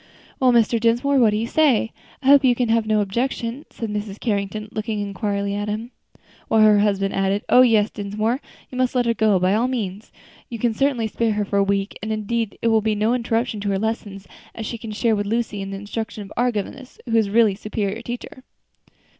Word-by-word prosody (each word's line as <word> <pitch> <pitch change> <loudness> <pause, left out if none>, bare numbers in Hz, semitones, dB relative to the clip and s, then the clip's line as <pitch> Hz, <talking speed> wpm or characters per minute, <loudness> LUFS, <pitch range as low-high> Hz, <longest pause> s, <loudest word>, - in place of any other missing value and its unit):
"Well, 255 -1 +4
Mr. 230 -1 +3
Dinsmore, 240 +5 +2
what 230 -3 +5
do 210 - 0
you 225 - -1
say? 250 -4 +2 0.3
I - - -2
hope 280 0 +7
you 250 -2 +4
can 245 -1 0
have 225 -1 +2
no 215 -1 +2
objection," 235 +5 -2
said 225 -3 -5
Mrs. 210 -1 -4
Carrington, 210 -1 -2
looking 215 0 -3
inquiringly 200 0 -2
at 205 +1 -3
him; 220 +3 -4 0.6
while 220 - +3
her 210 -1 +6
husband 195 -1 +1
added, 195 +1 0
"Oh! 250 - +7
yes, 220 -4 +4
Dinsmore, 215 +5 -2 0.3
you 255 - -5
must 255 0 +1
let 245 -1 +2
her 230 - +2
go 215 -3 +3
by 185 +1 +2
all 230 +4 +2
means; 215 -5 -4 0.4
you 235 - -5
can 230 0 0
certainly 270 -2 +1
spare 220 0 0
her 210 0 -1
for 200 - -1
a 200 - +4
week, 195 0 -1
and 220 - -4
it 215 -1 -3
need 230 -2 -2 0.3
be 215 -1 +1
no 215 +3 +1
interruption 230 -2 -1
to 205 0 -2
her 195 - +1
lessons, 205 -2 -4 0.3
as 225 - -5
she 230 +1 -5
can 225 - -8
share 220 +1 +1
with 205 0 -2
Lucy 220 -2 -1
in 195 - -5
the 195 - -5
instructions 210 +1 -5
of 195 - -12
our 245 +1 +2
governess, 250 +5 -6
who 230 -2 -1
is 220 -3 +3
really 220 -1 +4
a - - -8
superior 210 +1 -3
teacher." 240 +2 -7
220 Hz, 220 wpm, -22 LUFS, 205-235 Hz, 0.6 s, hope